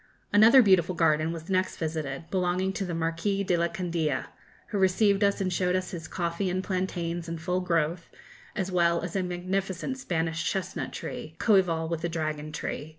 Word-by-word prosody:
Another 225 +5 +8
beautiful 185 -3 +4
garden 155 -1 +2
was 165 0 -7
next 185 -1 0
visited, 155 -1 -3
belonging 185 0 0
to 195 - -2
the 175 -2 -3
Marquis 165 +5 -1
de 185 -2 +1
la 170 0 +2
Candia, 170 -7 -2 0.4
who 205 - -1
received 195 +2 +3
us 200 0 +2
and 185 -2 -1
showed 180 +1 +1
us 185 -1 -2
his 165 -3 -6
coffee 170 +2 -2
and 185 +1 -1
plantains 175 -3 -2
in 165 - -3
full 180 +3 -1
growth, 170 -1 0 0.5
as 190 -2 -2
well 170 -1 +3
as 175 0 -5
a 190 - +2
magnificent 185 +6 -3
Spanish 165 -6 -1
chestnut 180 -8 -2
tree, 155 +1 -7
coëval 180 -7 +3
with 165 -1 -3
the 170 - -1
dragon 155 -2 -3
tree. 150 0 -4
175 Hz, 180 wpm, -28 LUFS, 165-190 Hz, 0.5 s, Another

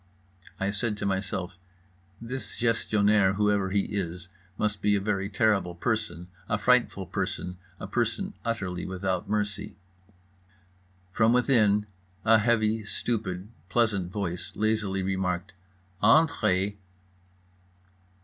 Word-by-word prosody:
I 95 +1 0
said 105 +1 -1
to - - -3
myself: 95 -2 -2 0.6
This 125 +3 -5
Gestionnaire, 105 -4 +3
whoever 105 -1 +2
he 100 +1 +2
is, 90 -4 -4 0.3
must 105 -1 -1
be 105 0 +3
a - - +2
very 100 -1 -1
terrible 100 -4 +1
person, 105 -4 -2 0.2
a 105 - +2
frightful 125 -5 +2
person, 90 -1 -3 0.2
a - - -5
person 120 - -1
utterly 95 -6 -2
without 95 -1 -2
mercy. 105 -1 -2 1.4
From 110 +4 +3
within 110 -5 +3 0.4
a 110 0 +6
heavy, 110 -1 +2
stupid, 105 -3 -3 0.2
pleasant 105 -7 +1
voice 90 -4 -3
lazily 105 -3 0
remarked: 95 0 -1 0.5
"_Entrez. 105 - +3
105 Hz, 110 wpm, -27 LUFS, 95-110 Hz, 1.4 s, a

